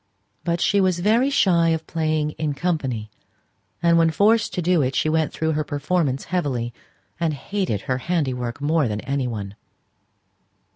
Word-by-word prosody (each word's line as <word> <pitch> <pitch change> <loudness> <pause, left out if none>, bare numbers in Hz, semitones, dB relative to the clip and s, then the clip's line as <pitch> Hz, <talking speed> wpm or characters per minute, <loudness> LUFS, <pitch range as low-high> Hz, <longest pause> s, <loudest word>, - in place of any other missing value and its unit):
But 170 0 0
she 200 +3 +3
was 185 -2 +2
very 225 +9 +3
shy 175 -11 +3
of 160 -1 -1
playing 155 -2 -1
in 150 -2 -1
company; 135 -10 -2 0.7
and 170 0 +5
when 165 0 +4
forced 210 +6 +3
to - - -1
do 175 -1 +3
it, 130 0 -1
she 155 - +1
went 160 -1 +1
through 160 0 -1
her 155 0 0
performance 145 -1 -1
heavily, 125 -9 -1 0.5
and 165 -3 0
hated 180 - -2
her 130 -2 -2
handiwork 130 -7 -2
more 150 -1 +1
than 105 -1 -3
any 135 0 -2
one. 100 -4 -5
155 Hz, 160 wpm, -23 LUFS, 135-175 Hz, 0.7 s, and